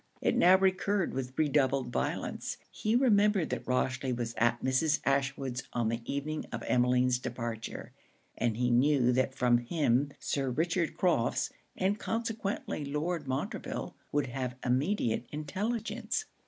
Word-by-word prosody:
It - - +1
now 185 +2 +7
recurred 190 0 +1
with 130 0 -4
redoubled 135 -4 +2
violence. - - -2
He 220 +2 0
remembered 210 - +3
that 125 -2 -4
Rochely 130 +1 0
was 115 -1 -3
at 120 +1 +1
Mrs. 130 +4 +2
Ashwood's 135 -2 0
on 120 -2 +1
the 115 +1 -2
evening 150 +2 -3
of - - -4
Emmeline's 125 0 +3
departure; 115 -2 -5 0.4
and 115 -2 0
he 125 0 +1
knew 125 0 +4
that 130 +1 +1
from 120 -2 +3
him 140 0 +1
Sir 135 -2 -1
Richard 165 +4 0
Crofts, 170 -11 +1 0.3
and 195 +3 +1
consequently 225 -8 -2
Lord 150 +2 -2
Montreville, 130 +1 -3 0.2
would 145 0 +1
have 125 0 -4
immediate 125 - +1
intelligence. 215 - -2
140 Hz, 135 wpm, -31 LUFS, 125-175 Hz, 0.4 s, now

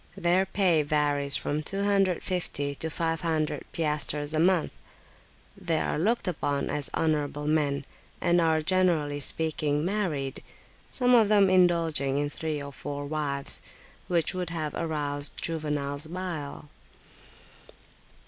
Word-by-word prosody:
Their 180 +2 +2
pay 180 -5 +3
varies 145 -1 +2
from 150 +1 -1
250 185 -5 0
to 160 +3 -4
500 165 -1 -1
piastres 150 -1 -1
a 155 - +1
month: 175 -1 +2 0.8
they 175 -5 -1
are - - -1
looked 220 +5 +1
upon 145 -5 -1
as 145 -2 -2
honourable 150 -2 0
men, 145 -3 +1 0.3
and 175 0 +3
are, 160 -1 +2
generally 165 -5 +2
speaking, 150 0 0
married, 175 -9 -2 0.5
some 250 -1 +2
of 225 -4 +6
them 200 -3 +5
indulging 165 -6 +3
in 145 0 -1
three 155 -1 -3
or 140 0 -7
four 145 +1 -5
wives, 145 -2 -2 0.5
which 170 -2 +1
would 180 -2 -3
have 155 -3 -3
aroused 145 -3 -2
Juvenal's 150 -2 -2
bile. 165 -5 -5
155 Hz, 120 wpm, -28 LUFS, 145-175 Hz, 0.8 s, of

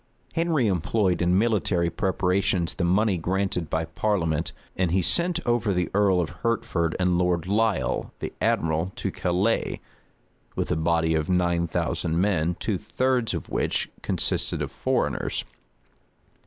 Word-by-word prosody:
} - - -33
Henry 165 -6 +1
employed 95 0 +1
in 90 +1 +3
military 100 -6 +1
preparations 95 -2 0
the 90 - -3
money 95 +2 +2
granted 90 -1 -1
by 80 +2 -1
parliament; 80 -2 -1 0.2
and 90 -2 +1
he 95 +3 +2
sent 175 - +3
over 120 -4 +1
the 90 -1 -1
earl 100 -2 +3
of 85 - -1
Hertford 115 -8 0
and 90 -1 +2
Lord 90 -2 +1
Lisle, 110 +3 0
the - - -5
admiral, 80 +3 +1
to - - -3
Calais, 95 +6 0 0.8
with - - -2
a - - +2
body 80 0 +1
of 80 +1 0
nine 85 -2 +2
thousand 80 +1 -1
men, 90 -3 +1
two 100 -5 -1
thirds 125 -5 0
of 80 - -6
which - - -1
consisted - - 0
of - - -5
foreigners. - - -1
90 Hz, 145 wpm, -25 LUFS, 85-105 Hz, 0.8 s, in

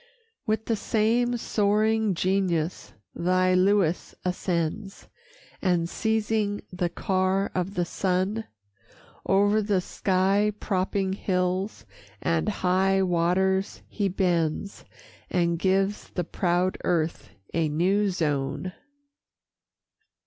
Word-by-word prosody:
With 220 0 0
the 230 - +1
same 230 +3 +1
soaring 215 -1 +1
genius 180 -2 -1 0.2
thy 185 +1 +2
Lewis 185 -2 +2
ascends, 180 +1 -2 0.5
And, 175 -3 +1
seizing 220 0 0
the 180 -1 -1
car 190 +2 0
of 185 +2 -2
the 175 - +1
sun, 190 +5 -1 0.8
O'er 205 +2 +4
the 200 -2 +1
sky 195 +3 +1
propping 190 0 -1
hills 185 +1 -1 0.3
and 80 -1 0
high 190 +1 +2
waters 185 +2 +1
he 205 -2 -1
bends, 175 0 -1 0.4
And 170 -2 +1
gives 195 +2 +1
the 180 - -2
proud 175 +2 0
earth 165 -2 -1 0.2
a 160 -1 +1
new 190 +7 +2
zone. 150 -1 -2
185 Hz, 100 wpm, -26 LUFS, 175-205 Hz, 0.8 s, O'er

